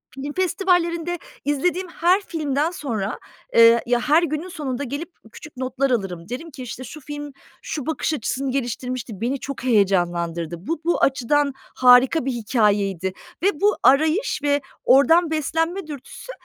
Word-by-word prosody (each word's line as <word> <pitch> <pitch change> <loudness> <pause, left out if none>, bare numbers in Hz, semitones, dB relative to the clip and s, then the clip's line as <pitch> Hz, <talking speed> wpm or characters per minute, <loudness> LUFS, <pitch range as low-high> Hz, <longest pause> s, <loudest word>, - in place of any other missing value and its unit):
film 280 +2 -5
festivallerinde 350 -2 0 0.3
izlediğim 355 +6 0
her 355 +3 +2
filmden 305 -4 -1
sonra, 225 - -3 0.4
eee, 230 0 +7
ya, 245 0 +2
her 305 +6 +3
günün 310 +2 -2
sonunda 285 -7 -4
gelip 285 +6 -5 0.2
küçük 300 +2 -12
notlar 260 +1 -1
alırım. 190 -6 -2
Derim 320 +7 -6
ki, 260 - -8
işte, 250 +1 -7
şu 305 +4 -10
film, 290 0 -7 0.3
şu 290 -5 -5
bakış 320 0 -1
açısını 270 0 -2
geliştirmişti. 250 -4 -4
Beni 260 +4 -1
çok 275 -2 -6
heyecanlandırdı. 175 -7 +1
Bu, 330 -1 -2
bu 345 - +1
açıdan 275 +2 +2 0.2
harika 250 +4 +5
bir 270 - 0
hikâyeydi 205 -6 0 0.3
ve - - +5
bu 415 +1 +4
arayış 315 - +3
ve 285 0 +2 0.2
oradan 320 +6 +5
beslenme 325 +4 -1
dürtüsü 295 - -9
275 Hz, 145 wpm, -22 LUFS, 240-325 Hz, 0.4 s, eee